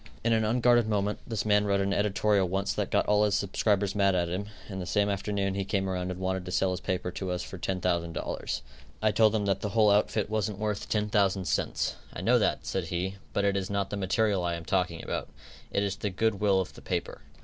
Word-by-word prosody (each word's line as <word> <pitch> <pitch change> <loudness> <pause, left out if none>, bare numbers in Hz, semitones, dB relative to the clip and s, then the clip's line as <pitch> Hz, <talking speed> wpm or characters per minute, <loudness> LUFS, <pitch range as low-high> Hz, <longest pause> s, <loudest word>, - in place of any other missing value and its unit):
In 115 0 +3
an 110 0 +2
unguarded 120 +1 +3
moment, 105 -1 0
this 115 -3 -2
man 105 -1 +4
wrote 100 -1 +2
an 100 0 +1
editorial 100 -1 +2
once 95 +2 -1
that - - -2
got - - +2
all 105 0 +3
his 105 -2 +2
subscribers 100 0 +1
mad 100 -2 +3
at 85 -1 +1
him, 95 +4 -3 0.2
and 95 -2 -5
the 90 - -5
same 105 +2 +2
afternoon 100 -1 -1
he 100 0 -1
came 95 0 -1
around 90 -1 -2
and 90 0 -5
wanted 95 0 -1
to 90 - -6
sell 95 +1 +2
his 90 - -2
paper 90 -1 -2
to 95 0 -4
us 90 0 -2
for 95 - -8
$10,000. 85 -3 -2 0.4
I 110 - +4
told 110 +1 +4
him 105 -2 0
that 100 -1 0
the 105 - -2
whole 105 0 +4
outfit 105 +1 +2
wasn't 105 -2 -1
worth 105 -1 -3
ten 105 -1 0
thousand 100 -3 +2
cents. - - -1
"I - - -6
know - - +4
that," - - 0
said 95 -3 -2
he, 90 +3 -3
"but 100 - 0
it 100 -1 +2
is 95 -1 -2
not 100 -1 -1
the - - -1
material 100 0 +1
that 90 - -1
I 85 - 0
am 85 0 -7
talking 90 -3 0
about. - - -3 0.4
It 100 - 0
is 100 -1 -1
the 105 - -2
good 100 +2 0
will 100 -2 +3
of 95 - -3
the - - -13
paper." - - -3
100 Hz, 245 wpm, -28 LUFS, 95-105 Hz, 0.4 s, man